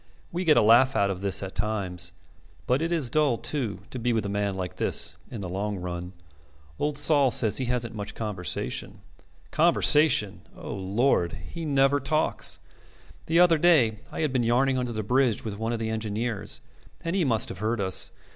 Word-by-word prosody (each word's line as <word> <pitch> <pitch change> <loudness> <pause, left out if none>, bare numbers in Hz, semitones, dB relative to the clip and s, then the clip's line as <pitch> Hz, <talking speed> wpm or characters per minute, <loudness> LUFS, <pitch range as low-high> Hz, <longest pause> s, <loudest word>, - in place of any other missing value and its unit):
We 180 +2 -3
get 155 -2 +5
a - - +5
laugh 125 +5 +5
out 100 -1 +2
of 95 -1 -6
this 100 0 +1
at 95 - -6
times; 95 -4 -3 0.5
but 130 +4 +1
it 165 +1 -1
is 155 -8 0
dull, 150 -6 +2
too, 110 -11 -3
to 130 - -5
be 120 +1 0
with 110 -2 -1
a - - -3
man 100 -1 -1
like 90 -1 -5
this - - 0
in 115 - -7
the 95 - -4
long 100 +3 -3
run. 90 0 -6 0.7
Old 145 0 -1
Sol 145 -2 +5
says 110 -2 +2
he 130 - -1
hasn't 120 -2 -2
much 105 -2 -6
conversation. 105 -5 -3 0.5
Conversation! 140 -10 +4 0.2
O - - -7
Lord! 95 -1 0 0.2
He 170 -1 -5
never 140 -1 +3
talks. 150 +3 0 0.7
The 165 +2 +3
other 170 -3 +5
day 135 -11 +4
I - - -4
had 150 -4 0
been 125 - +2
yarning 130 +3 +2
under 125 -1 -3
the 110 -1 -3
bridge 125 0 +1
with 105 -2 -5
one 115 +1 -2
of 120 - -1
the 110 0 -3
engineers, 110 0 -3 0.4
and 170 +2 -3
he 190 - +2
must 115 -6 +1
have 90 - -8
heard 110 +2 -1
us. 95 -2 0
115 Hz, 195 wpm, -26 LUFS, 100-135 Hz, 0.7 s, get